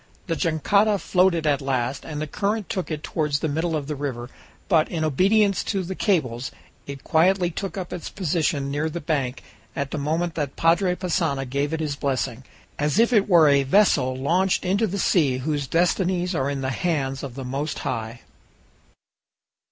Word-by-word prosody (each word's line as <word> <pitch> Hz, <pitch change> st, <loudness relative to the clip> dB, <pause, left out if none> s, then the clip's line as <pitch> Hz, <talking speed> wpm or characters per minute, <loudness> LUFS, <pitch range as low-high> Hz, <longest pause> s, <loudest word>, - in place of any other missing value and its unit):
The 165 Hz, -, -1 dB
jangada 200 Hz, +7 st, +2 dB
floated 180 Hz, -3 st, +2 dB
at 145 Hz, -1 st, +2 dB
last, 130 Hz, -1 st, -2 dB
and 150 Hz, -2 st, -5 dB
the 155 Hz, -, -2 dB
current 205 Hz, +6 st, -2 dB
took 185 Hz, -, -3 dB
it 155 Hz, -1 st, -4 dB
toward 150 Hz, -3 st, -2 dB
the 145 Hz, +3 st, +1 dB
middle 160 Hz, +3 st, -1 dB
of 150 Hz, -2 st, -2 dB
the 150 Hz, -, -3 dB
river, 130 Hz, -4 st, -5 dB, 0.4 s
but, 165 Hz, -5 st, +3 dB
in 160 Hz, -2 st, -2 dB
obedience 195 Hz, +7 st, +3 dB
to 195 Hz, -3 st, -1 dB
the 185 Hz, +2 st, -4 dB
cables, 130 Hz, -, 0 dB, 0.4 s
it 140 Hz, -1 st, -8 dB
quietly 175 Hz, +2 st, +3 dB
took 195 Hz, +3 st, -5 dB
up 185 Hz, -2 st, -5 dB
its 180 Hz, -, -5 dB
position 155 Hz, -6 st, -1 dB
near 150 Hz, +3 st, -1 dB
the 170 Hz, -, -5 dB
bank 140 Hz, -5 st, -2 dB, 0.3 s
at 140 Hz, -1 st, -3 dB
the 155 Hz, -, -3 dB
moment 160 Hz, +4 st, -1 dB
that 145 Hz, -4 st, -3 dB
Padre 180 Hz, +2 st, +2 dB
Passanha 165 Hz, -7 st, -1 dB
gave 140 Hz, +3 st, -1 dB
it 160 Hz, 0 st, -2 dB
his 150 Hz, -2 st, -2 dB
blessing, 130 Hz, -3 st, -2 dB, 0.4 s
as 150 Hz, +4 st, 0 dB
if 235 Hz, +2 st, +4 dB
it 210 Hz, -2 st, +3 dB
were 170 Hz, -4 st, +6 dB
a 140 Hz, -1 st, +5 dB
vessel 135 Hz, -4 st, +3 dB
launched 180 Hz, +9 st, +1 dB
into 200 Hz, +5 st, +2 dB
the 200 Hz, +1 st, -3 dB
sea 150 Hz, -9 st, +2 dB
whose 145 Hz, +1 st, -2 dB
destinies 180 Hz, +2 st, +1 dB
are 135 Hz, -4 st, 0 dB
in 140 Hz, -1 st, -3 dB
the 130 Hz, 0 st, -1 dB
hands 135 Hz, -2 st, -1 dB
of 135 Hz, -4 st, -7 dB
the 135 Hz, -1 st, -6 dB
Most 140 Hz, +4 st, -3 dB
High! 115 Hz, +1 st, -4 dB
155 Hz, 185 wpm, -24 LUFS, 140-180 Hz, 0.4 s, were